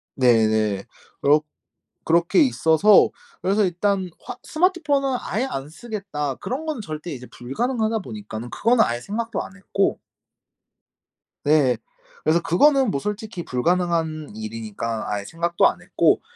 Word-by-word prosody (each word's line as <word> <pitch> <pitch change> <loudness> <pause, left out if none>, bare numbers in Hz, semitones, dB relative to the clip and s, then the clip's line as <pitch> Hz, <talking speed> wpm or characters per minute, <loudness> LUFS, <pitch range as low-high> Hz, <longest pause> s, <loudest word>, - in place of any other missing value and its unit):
네네. 110 -5 +3 0.4
그렇 150 +2 +5 0.6
그렇게 170 - +3
있어서 205 - +5 0.3
그래서 200 +3 +2
일단 190 +1 0
화 - - -6
'스마트폰은 300 -6 +1
아예 230 +6 -1
안 135 - -5
쓰겠다.' 180 - -4
그런 265 - -4
거는 305 -7 -3
절대 155 -2 -6
이제 125 -3 -7
불가능하다 225 - -1
보니까는 110 - -7
그거는 230 - +3
아예 120 0 -1
생각도 225 - -3
안 - - -11
했고 195 0 0 1.4
네. 145 -5 +3 0.5
그래서 160 +2 +3
그거는 270 - +4
뭐 140 - -1
솔직히 210 - -4
불가능한 160 - 0
일이니까 110 0 -4
아예 105 -1 -2
생각도 170 +7 +2
안 - - -7
했고 - - +2
170 Hz, 300 characters per minute, -23 LUFS, -, 1.4 s, 그렇